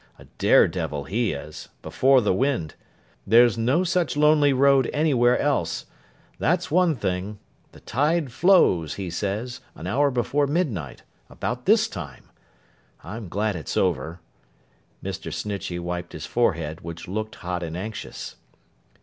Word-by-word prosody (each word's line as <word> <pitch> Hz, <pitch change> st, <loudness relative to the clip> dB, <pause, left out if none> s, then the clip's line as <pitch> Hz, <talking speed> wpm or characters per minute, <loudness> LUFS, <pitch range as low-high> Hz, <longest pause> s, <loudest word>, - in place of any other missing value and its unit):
—a -, -, -15 dB
dare -, -, +6 dB
devil 75 Hz, -5 st, -4 dB
he 115 Hz, -, -1 dB
is—before 125 Hz, -, 0 dB
the 105 Hz, -, +1 dB
wind. 125 Hz, -, 0 dB, 0.5 s
There's 120 Hz, 0 st, +6 dB
no 125 Hz, +10 st, +1 dB
such 175 Hz, -4 st, 0 dB
lonely 150 Hz, -1 st, +5 dB
road 135 Hz, -1 st, +4 dB
anywhere 130 Hz, -5 st, +3 dB
else. 85 Hz, -, -1 dB, 0.5 s
That's 175 Hz, -1 st, 0 dB
one 175 Hz, -1 st, +3 dB
thing. 95 Hz, -1 st, -3 dB, 0.3 s
The -, -, -16 dB
tide 150 Hz, +2 st, 0 dB
flows, 115 Hz, -, +3 dB
he 95 Hz, -3 st, -5 dB
says, 105 Hz, +7 st, -3 dB
an 80 Hz, -, -9 dB
hour 140 Hz, +10 st, +2 dB
before 140 Hz, +3 st, 0 dB
midnight—about 125 Hz, -, -4 dB
this 220 Hz, +2 st, +5 dB
time. 80 Hz, -8 st, -9 dB, 0.7 s
I'm 110 Hz, -2 st, -7 dB
glad 105 Hz, +3 st, -1 dB
it's 80 Hz, -6 st, -5 dB
over.' 85 Hz, -2 st, 0 dB, 0.8 s
Mr. -, -, -5 dB
Snitchey 100 Hz, -4 st, -4 dB
wiped 90 Hz, 0 st, -5 dB
his 80 Hz, -, -6 dB
forehead, 85 Hz, -9 st, -1 dB
which 85 Hz, 0 st, -8 dB
looked 110 Hz, +5 st, -4 dB
hot 90 Hz, 0 st, -4 dB
and 85 Hz, 0 st, -5 dB
anxious. 110 Hz, +3 st, -7 dB
110 Hz, 130 wpm, -24 LUFS, 90-140 Hz, 0.8 s, dare